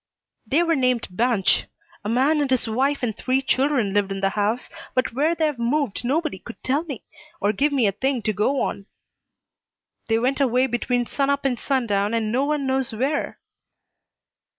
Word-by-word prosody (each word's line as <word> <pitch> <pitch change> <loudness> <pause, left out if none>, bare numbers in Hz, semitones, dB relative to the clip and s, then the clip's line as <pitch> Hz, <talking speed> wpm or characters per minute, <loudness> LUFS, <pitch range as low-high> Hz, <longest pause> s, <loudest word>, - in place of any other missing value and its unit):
"They 295 +9 +3
were 335 -1 +2
named 255 -3 +1
Banch. 215 -1 +2 0.4
A 205 - -3
man 275 +6 +3
and 285 - 0
his 255 -2 +1
wife 265 +5 0
and 220 -4 -1
three 255 +3 0
children 265 -5 +1
lived 205 -1 +1
in 195 - -3
the 195 0 +2
house, 210 +4 -1 0.3
but 255 -2 +1
where 305 +7 +1
they've 305 -6 0
moved 245 -1 0
nobody 290 - -1
could 230 - -10
tell 280 +5 +1
me, 280 -8 -7 0.4
or 205 +1 +1
give 290 +8 +1
me 270 -5 +2
a 200 - +3
thing 255 +4 -1
to 215 - 0
go 220 +8 +1
on. 200 0 -3 1.2
They 225 - +2
went 260 +4 0
away 255 -1 +3
between 245 0 0
sun 275 +3 -1
up 280 0 0
and 265 -2 +2
sun 265 -3 0
down 205 +1 0
and 220 -2 0
no 260 +4 +1
one 295 -1 -1
knows 265 -1 0
where." 270 +7 -1
255 Hz, 190 wpm, -23 LUFS, 220-280 Hz, 1.2 s, They